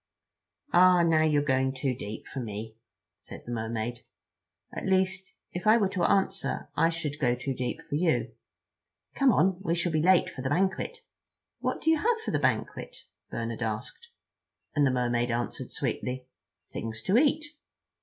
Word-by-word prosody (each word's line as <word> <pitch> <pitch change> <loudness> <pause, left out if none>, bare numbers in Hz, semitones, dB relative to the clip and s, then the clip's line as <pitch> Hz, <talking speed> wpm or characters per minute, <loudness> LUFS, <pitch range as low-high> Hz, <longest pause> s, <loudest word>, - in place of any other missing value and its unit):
"Ah, 180 0 +7
now 165 -2 +4
you're 150 -2 +3
going 130 -1 +2
too 130 0 0
deep 110 -4 -7
for 135 - -6
me," 110 -1 -6 0.4
said - - -11
the 120 - -6
Mermaid, 115 +1 -3 0.7
"at - - -4
least 190 0 +1 0.2
if 180 +4 -4
I 220 +2 +7
were 200 -4 +2
to 185 -3 -1
answer 195 +1 0
I 165 - +4
should 155 -3 -4
go 125 -3 +2
too 125 +2 -3
deep 125 -1 -3
for - - -7
you. 160 +2 +1 0.8
Come 275 -2 +4
on—we 190 -3 +2
shall 175 0 0
be 155 -1 +1
too 170 - +1
late 185 -2 +5
for - - -7
the 130 - -2
banquet." 190 - 0 0.6
"What - - -2
do 320 - +3
you 320 - +4
have 455 +7 +1
for - - -1
the - - +1
banquet?" - - -1 0.3
Bernard 115 0 -4
asked; 110 - -4 0.7
and 145 -2 +4
the - - +2
Mermaid 120 -1 +1
answered 120 +1 -3
sweetly: 125 0 -3 0.5
"Things 115 0 -5
to 190 - +1
eat." 300 +1 +2
150 Hz, 170 wpm, -28 LUFS, 120-190 Hz, 0.8 s, Ah